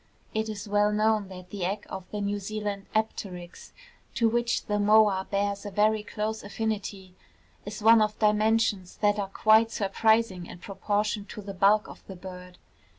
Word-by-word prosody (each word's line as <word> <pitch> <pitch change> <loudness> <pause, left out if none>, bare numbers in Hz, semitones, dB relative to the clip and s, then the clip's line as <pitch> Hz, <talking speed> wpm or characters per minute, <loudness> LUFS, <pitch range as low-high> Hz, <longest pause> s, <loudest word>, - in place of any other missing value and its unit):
It 220 0 -1
is 210 -1 -6
well 205 0 +2
known 215 -1 +1
that 185 -1 -11
the 200 -3 -4
egg 200 +3 -2
of 185 -1 -8
the 210 - -4
New 205 0 -1
Zealand 205 0 -4
apteryx, 185 -5 -4 0.4
to 230 -3 +3
which 235 +1 0
the 210 0 -1
moa 205 -2 +4
bears 200 0 -1
a 205 - -5
very 215 +2 +2
close 215 +1 -4
affinity, 200 -3 -4 0.5
is 210 +1 -6
one 225 0 +7
of 215 0 0
dimensions 210 -3 +1
that 205 0 +3
are 195 -1 -2
quite 220 +3 +4
surprising 210 -3 +1
in - - -10
proportion 205 +2 -2
to 210 - -9
the 200 0 -6
bulk 200 +3 +3
of - - -12
the 190 - -8
bird. 180 0 -10
205 Hz, 170 wpm, -27 LUFS, 195-215 Hz, 0.5 s, one